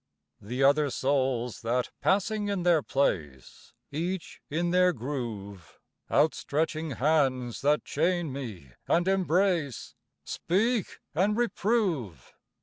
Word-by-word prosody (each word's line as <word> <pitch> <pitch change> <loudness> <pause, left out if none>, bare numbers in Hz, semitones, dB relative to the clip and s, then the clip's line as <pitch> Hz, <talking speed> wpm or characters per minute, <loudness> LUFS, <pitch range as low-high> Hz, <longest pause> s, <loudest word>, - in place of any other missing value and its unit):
The 125 +6 -2
other 145 +1 +4
souls 130 -3 0
that, 120 +2 -1
passing 205 +2 +1
in 200 -3 -1
their 170 -3 +4
place, 75 - -2 0.2
Each 170 +4 -4
in 170 +3 0
their 180 0 +4
groove; 110 - -6 0.3
Out 155 +1 +4
stretching 155 +2 -2
hands 130 -3 +1
that 145 +2 +2
chain 170 -1 0
me 105 - -7 0.2
and 175 +2 +2
embrace, 180 - +1 0.3
Speak 215 +4 0
and 195 +7 +2
reprove. 190 - -1
150 Hz, 110 wpm, -28 LUFS, 125-180 Hz, 0.3 s, other